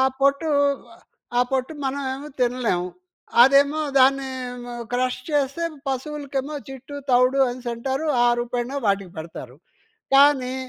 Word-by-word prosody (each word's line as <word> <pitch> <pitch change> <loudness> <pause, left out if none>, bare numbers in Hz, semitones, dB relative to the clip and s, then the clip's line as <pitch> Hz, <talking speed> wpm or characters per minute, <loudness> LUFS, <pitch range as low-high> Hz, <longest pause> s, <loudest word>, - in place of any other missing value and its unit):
ఆ - - +5 0.2
పొట్టు, 280 +3 +2 0.9
ఆ - - +5
పొట్టు 265 +2 -1
మనమేమో 270 +1 -3
తినలేము. 240 -8 0 0.5
అదేమో 280 +3 +5 0.2
దాన్ని 270 0 +4 0.6
క్రష్ 250 0 0
చేస్తే 290 +3 0 0.2
పశువులకేమో 280 +1 -3
జిట్టు, 270 +2 -9
తౌడు 250 +2 +4
అనేసి 245 0 -5
అంటారు. 265 +6 -3 0.2
ఆ - - +5
రూపేన 245 +3 -3
వాటికి 195 -3 0
పెడతారు. 140 -5 -8 0.6
కానీ 270 -2 +5
265 Hz, 110 wpm, -23 LUFS, 245-280 Hz, 0.9 s, ఆ